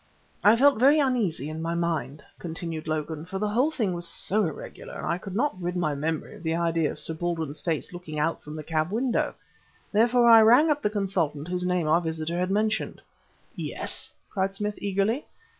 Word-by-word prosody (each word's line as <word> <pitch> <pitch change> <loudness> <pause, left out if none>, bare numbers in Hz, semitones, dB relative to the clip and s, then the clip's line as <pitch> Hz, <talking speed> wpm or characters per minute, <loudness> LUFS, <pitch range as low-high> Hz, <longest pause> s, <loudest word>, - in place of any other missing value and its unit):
"I 210 +2 +7
felt 275 0 +4
very 280 +5 +6
uneasy 230 - 0
in 155 +1 -5
my 165 +1 -2
mind," 155 -5 -2 0.2
continued 165 -1 -5
Logan, 155 0 -3
"for 180 +3 -5
the 210 +1 -1
whole 250 +8 +2
thing 225 - -1
was 175 0 -2
so 210 +5 +1
irregular, 155 - -8
and - - -5
I 170 - -1
could 195 0 -7
not 240 -6 0
rid 175 +1 -2
my 165 -4 0
memory 155 +2 -3
of - - -12
the 165 -1 -1
idea 165 -2 +1
of - - -6
Sir 160 - -1
Baldwin's 160 -3 -3
face 165 0 -2
looking 175 -3 -7
out 155 +3 0
from 150 +1 -9
the 155 - -6
cab 155 +1 -1
window. 235 +4 0 0.6
Therefore 235 +3 +4
I 225 -1 +9
rang 245 +8 +6
up 295 0 0
the 210 - +1
consultant 180 -7 -1
whose 180 0 -1
name 180 -3 0
our 165 +3 +4
visitor 160 +1 -2
had 180 +1 0
mentioned." 215 +2 0 0.6
"Yes?" - - -3 0.2
cried 195 -1 -1
Smith 210 +1 -2
eagerly. 200 +7 0
180 Hz, 200 wpm, -26 LUFS, 160-215 Hz, 0.6 s, I